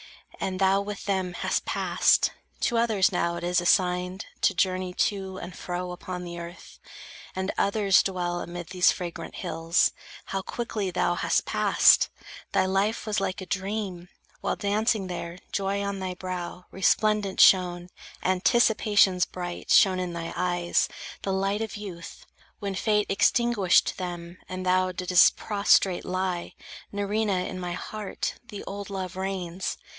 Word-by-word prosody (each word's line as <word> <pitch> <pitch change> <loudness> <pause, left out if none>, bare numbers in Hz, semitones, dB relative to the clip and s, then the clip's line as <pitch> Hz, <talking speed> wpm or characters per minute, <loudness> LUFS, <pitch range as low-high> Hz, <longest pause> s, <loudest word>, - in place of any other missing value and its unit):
And 185 -1 -2
thou 195 +1 +3
with 205 0 -6
them 190 -3 -1
Hast - - -1
passed. - - +2 0.3
To 240 - +1
others 220 -5 +3
now 170 -1 0
it 170 - -6
is 175 0 +2
assigned 180 +1 +1 0.2
To 195 - +3
journey 185 0 0
to 190 -2 -1
and 180 -1 -8
fro 180 0 -4
upon 180 0 -6
the 175 -1 -7
earth, 170 +1 -10 0.6
And 190 +1 -1
others 200 -2 +4
dwell 175 -2 -2
amid 175 -1 -7
these 180 0 +4
fragrant 170 -2 -6
hills. 165 +1 +1 0.3
How 195 - -3
quickly 215 -2 -3
thou 175 0 +1
hast - - +1
passed! - - +4 0.4
Thy - - +3
life 195 +4 0
was 215 -1 0
like 190 0 -2
A - - -6
dream. 190 -2 -4 0.3
While - - -1
dancing 210 0 0
there, 175 -1 -5
joy 200 0 -1
on 200 -1 -3
thy 185 -1 -4
brow 180 -1 -6
Resplendent 205 +1 +1
shone, 180 -1 +5 0.3
anticipations 200 -1 +3
bright 175 -1 -6
Shone 185 -2 +5
in 180 -1 -3
thy 165 -1 -5
eyes, 175 -1 +1 0.3
the 195 - -2
light 195 +2 0
of 220 -1 -4
youth, 185 -5 -9 0.3
when 200 -1 -4
Fate 210 +2 +1
Extinguished 205 -3 +3
them, 175 -1 -6
and 185 0 -5
thou 185 0 +2
didst 180 -1 +4
prostrate 200 -3 +2
lie. 185 -1 -2 0.4
Nerina, 205 -2 0
in 185 - -6
my 175 -1 -4
heart 210 +3 -4
the 205 -3 -8
old 200 0 -6
love 185 -2 -5
reigns. 190 -1 -3
185 Hz, 150 wpm, -26 LUFS, 180-200 Hz, 0.6 s, shone